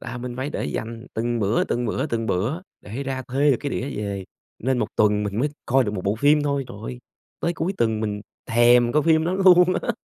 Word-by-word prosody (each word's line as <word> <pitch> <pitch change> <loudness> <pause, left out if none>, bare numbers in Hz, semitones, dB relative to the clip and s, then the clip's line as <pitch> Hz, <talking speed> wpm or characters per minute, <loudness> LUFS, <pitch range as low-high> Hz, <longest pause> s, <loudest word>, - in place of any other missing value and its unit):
Là 120 +1 -6
mình 125 0 -6
phải 130 +3 -3
để - - -3
dành 115 +2 -5
từng 120 +1 -1
bữa, 105 +2 +2
từng 120 - -2
bữa, 130 +6 -1
từng 115 -5 -2
bữa 110 - -1 0.2
để 115 +7 -6
ra 135 -1 -3
thuê 140 +4 +2
được 130 - +3
cái 145 - -3
đĩa 130 +2 -3
về, 100 -2 -3 0.3
nên 130 +2 0
1 - - 0
tuần 105 -1 +3
mình 105 +1 -3
mới 145 - +2 0.2
coi 130 +1 +3
được 105 - -2
1 90 - -5
bộ 100 +1 +1
phim 145 +4 +4
thôi. 140 -1 0
Trời 120 - -9
ơi, 60 0 -6 0.4
tới 170 - 0
cuối 170 +3 -1
tuần 110 -2 +1
mình 105 -2 -2 0.3
thèm 120 +1 +5
coi 150 +2 +3
phim 160 -1 +3
đó 175 - 0
luôn 185 -2 +7 0.2
á. - - -1
120 Hz, 245 wpm, -23 LUFS, 110-140 Hz, 0.4 s, luôn